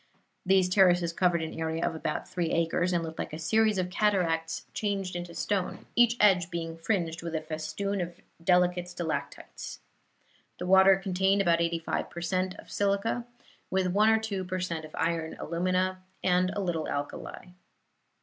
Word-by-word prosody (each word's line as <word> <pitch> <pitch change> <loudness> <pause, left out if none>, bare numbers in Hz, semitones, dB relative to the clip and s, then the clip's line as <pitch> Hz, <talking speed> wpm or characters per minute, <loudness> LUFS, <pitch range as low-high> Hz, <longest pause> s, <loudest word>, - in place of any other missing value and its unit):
These 190 0 +4
terraces 180 -3 +4
covered 175 -2 +2
an 160 - -5
area 160 0 -1
of - - -2
about 155 -1 -3
three 175 -3 -2
acres, 170 +2 +1
and 170 -1 +1
looked 160 0 -7
like - - -4
a - - -4
series 215 +5 +2
of 180 -1 -1
cataracts 170 -6 0
changed 195 -3 -2
into 175 -1 -6
stone, 195 -3 -2
each 240 0 +5
edge 185 -4 +4
being 165 -2 -4
fringed 165 -1 -1
with 165 -1 -4
a 155 - -1
festoon 165 +6 -3
of 175 0 -6 0.2
delicate 180 0 +3
stalactites. 175 -3 -5 0.8
The - - -5
water 190 +1 +7
contained 195 +1 +1
about 170 -2 +3
eighty 170 0 +1
five 165 - -3
per 170 - -7
cent. 185 +2 -1
of - - -13
silica, 205 +4 0 0.4
with 190 -1 +1
one 210 +2 +5
or 220 - +5
two 210 -4 -3
per 185 0 -3
cent 165 -3 -3
of 155 - -11
iron 165 -1 -1
alumina, 185 +2 0 0.2
and 180 0 +3
a 205 - -1
little 170 -4 -2
alkali. 145 +5 -5
180 Hz, 170 wpm, -29 LUFS, 165-190 Hz, 0.8 s, water